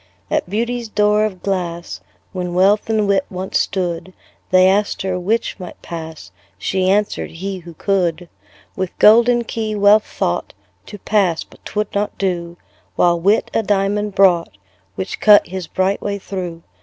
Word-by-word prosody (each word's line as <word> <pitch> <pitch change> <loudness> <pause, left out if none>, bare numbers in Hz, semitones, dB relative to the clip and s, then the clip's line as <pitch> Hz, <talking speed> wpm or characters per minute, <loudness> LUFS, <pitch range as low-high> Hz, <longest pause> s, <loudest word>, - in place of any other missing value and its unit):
At - - 0
Beauty's 235 +3 -2
door 210 0 +2
of 190 -4 -6
glass, 175 -3 -3 0.3
When 180 -2 -4
Wealth 200 +4 +3
and 215 -2 +1
Wit 195 -1 +2
once 185 +1 -2
stood, 180 -1 -2 0.4
They 185 0 +5
asked 200 +1 +1
her 185 -1 -2
'which 215 +4 -1
might 180 -2 -9
pass?" 160 -2 -8 0.3
She 185 -1 0
answered, 205 +2 0
"he, 190 +3 -5
who 170 -1 -12
could." 180 -2 -1 0.5
With 185 -2 -4
golden 235 +3 +5
key 220 -1 -3
Wealth 205 +1 +4
thought 85 - -2 0.3
To 205 - -8
pass 195 -5 +1
but - - -21
'twould 210 0 -3
not 205 +1 -2
do: 175 -3 -2 0.4
While 175 -1 +3
Wit 200 +6 +2
a - - +2
diamond 205 0 0
brought, 175 - +3 0.4
Which 95 - -5
cut 210 -1 +6
his 185 -1 -6
bright 190 +3 0
way 200 -1 -2
through. 180 -4 -6
195 Hz, 155 wpm, -19 LUFS, 180-210 Hz, 0.5 s, cut